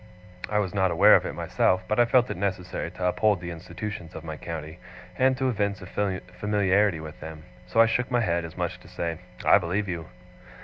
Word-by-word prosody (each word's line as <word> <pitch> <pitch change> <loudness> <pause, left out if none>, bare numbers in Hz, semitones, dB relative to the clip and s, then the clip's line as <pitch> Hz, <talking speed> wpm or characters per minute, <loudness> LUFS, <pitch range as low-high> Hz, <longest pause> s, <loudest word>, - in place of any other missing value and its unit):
I 105 - 0
was 100 -4 0
not 95 -2 +2
aware 95 +5 +7
of - - +2
it - - -5
myself, 95 0 +1
but 105 +4 0
I 120 - +6
felt 125 +1 +4
it - - -3
necessary 90 -2 -3
to 90 +1 -5
uphold 100 +2 +2
the 85 -1 -6
institutions 85 +1 -7
of 80 - -7
my 80 -1 -5
county, 80 +1 -7 0.4
and 130 0 +3
to 130 +1 0
evince 100 -4 -1
a 95 +1 -2 0.2
familiarity 100 -3 +2
with 75 -1 -9
them; 80 0 -9 0.2
so - - 0
I 115 - +9
shook 125 +2 0
my 120 -2 +2
head, 85 -5 0
as 85 - -9
much - - -1
as - - -12
to - - -17
say, 85 -1 -4 0.3
'I - - +7
believe 95 +4 -2
you! 85 -3 -4
95 Hz, 220 wpm, -26 LUFS, 85-105 Hz, 0.4 s, I